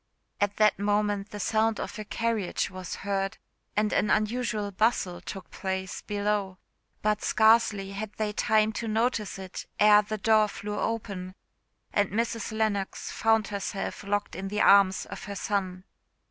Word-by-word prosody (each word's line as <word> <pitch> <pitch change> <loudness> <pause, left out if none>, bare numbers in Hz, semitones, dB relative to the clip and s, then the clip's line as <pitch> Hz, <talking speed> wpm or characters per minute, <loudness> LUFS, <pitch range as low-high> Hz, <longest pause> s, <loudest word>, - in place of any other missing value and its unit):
At 205 0 0
that 215 -2 +4
moment 205 0 0
the 205 - -7
sound 220 +2 +1
of - - -5
a - - -3
carriage 225 -4 -1
was 185 -2 -6
heard, 195 -1 -1 0.4
and 210 0 +2
an 210 - +2
unusual 215 -2 0
bustle 190 -3 +1
took 190 -3 -8
place 190 -1 -4
below; 205 -2 -1 0.5
but 210 0 +1
scarcely 220 -3 +3
had 200 +1 -5
they 215 -1 -2
time 215 +1 +2
to 230 - -4
notice 220 -1 0
it 190 -1 -7
ere 210 0 +7
the 215 +1 -4
door 215 +1 +4
flew 210 0 -5
open, 195 -5 -3 0.6
and 205 -1 +2
Mrs. 230 +1 -2
Lennox 215 -3 -1
found 225 -2 +2
herself 200 -1 -4
locked 205 0 -2
in 195 - -4
the 210 +2 -1
arms 195 -1 +5
of - - -8
her 200 - -6
son. 185 -3 -2
210 Hz, 155 wpm, -28 LUFS, 195-215 Hz, 0.6 s, ere